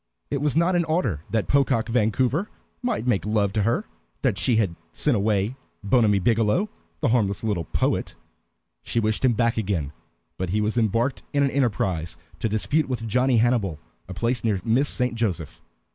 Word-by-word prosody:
It 140 - -1
was 150 0 +1
not 170 +2 +3
in 175 - +3
order 145 - 0
that 110 -2 0
Pocock 135 -5 +2
Vancouver 125 - +1 0.3
might 240 - -1
make 120 -6 +1
love 105 -2 +1
to 110 - +1
her 120 - +1 0.4
that 125 -7 +2
she 120 +6 +2
had 100 -6 +1 0.2
sent 145 -5 +1
away 105 +2 +1 0.3
Bonamy 105 -1 +3
Biggielow, 115 - +2 0.3
the - - +2
harmless 105 -4 +1
little 100 -7 -1
poet. - - -1 0.7
She 115 - -1
wished 110 +1 0
him 130 -2 +4
back 115 0 +1
again, 95 -10 -1 0.5
but 95 -1 -2
he 105 +4 +1
was 105 +2 0
embarked 115 +3 +1
in 140 0 +3
an 140 - +1
enterprise 95 - -1 0.2
to 110 - 0
dispute 135 +8 0
with 120 -3 -3
Johnny 125 +3 +2
Hannibal 110 -8 +2 0.3
a 95 - -6
place 120 +5 -1
near 105 -4 +1
Miss 130 +6 +2
St. 125 -2 0
Joseph. 110 -7 -2
Mrs. - - -37
115 Hz, 180 wpm, -24 LUFS, 105-130 Hz, 0.7 s, him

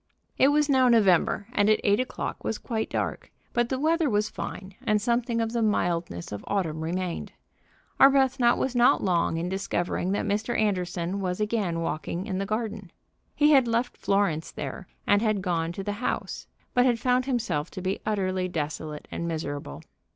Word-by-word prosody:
It 265 - +6
was 295 +1 +3
now 260 -3 +4
November, 205 -3 +3
and 205 +1 +3
at 215 - +4
eight 205 +2 +3
o'clock 255 - -4
was 220 - -2
quite 220 -3 -3
dark, - - -3 0.2
but 240 -1 +1
the 260 - -1
weather 320 +2 +2
was 210 -1 0
fine, 190 +1 -6
and 215 0 +2
something 235 +1 0
of 225 -1 0
the 235 - 0
mildness 170 - -1
of 105 - -6
autumn 160 -6 -1
remained. 175 +1 -3 0.7
Arbuthnot 265 -3 +5
was 260 -1 -1
not 245 0 +4
long 170 -3 +1
in 170 +2 -2
discovering 185 -1 -1
that - - -1
Mr. 215 +3 -1
Anderson 180 -3 -1
was 180 0 -2
again 210 -6 -1
walking 165 +3 -3
in 190 -3 -3
the 195 - -2
garden. 215 -4 -3 0.4
He 295 +1 +4
had 265 -4 +5
left 235 +2 0
Florence 195 -6 0
there 145 +6 -6 0.2
and 205 0 +4
had 215 -4 0
gone 170 -3 0
to 195 - -5
the 205 - -2
house, - - -3 0.3
but 245 - +4
had 245 -2 +3
found 250 +1 +1
himself 220 - -1
to 185 - -7
be 190 +1 -2
utterly 185 -3 -1
desolate 155 -2 -4
and 170 - -3
miserable. 155 -3 -5
205 Hz, 180 wpm, -26 LUFS, 175-235 Hz, 0.7 s, It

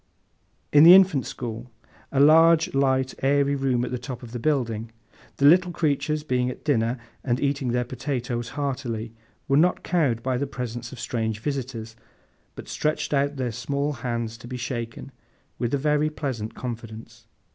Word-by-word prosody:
In 145 - +8
the 175 +3 +11
Infant 185 -8 +4
School—a 120 +3 -7
large, 165 +3 +6
light, 130 -1 +1
airy 140 +1 +2
room 130 -3 0
at - - -6
the 125 - -3
top 125 0 -7
of 115 - -10
the 120 - -5
building—the 115 -2 -3
little 180 +4 +6
creatures, 150 -1 0
being 125 -4 0
at 125 - -9
dinner, 120 -4 +1 0.3
and 125 -1 0
eating 140 -2 -1
their 125 0 +1
potatoes 120 -2 -3
heartily, 125 -6 -3 0.3
were 135 - +3
not 175 +4 +3
cowed 140 -10 +1
by 130 -1 0
the 140 +2 -2
presence 120 -3 -6
of 130 - -10
strange 110 -3 -2
visitors, 120 -4 -4 0.6
but - - -9
stretched 155 0 -1
out 140 +1 +1
their 130 -3 -2
small 140 +6 -2
hands 115 -2 -4
to 120 - -11
be 125 +1 -5
shaken, 120 -2 -5 0.5
with 120 - -1
a 140 - +2
very 150 +2 +1
pleasant 130 -8 -4
confidence. 115 -1 -8
130 Hz, 160 wpm, -25 LUFS, 115-145 Hz, 0.6 s, the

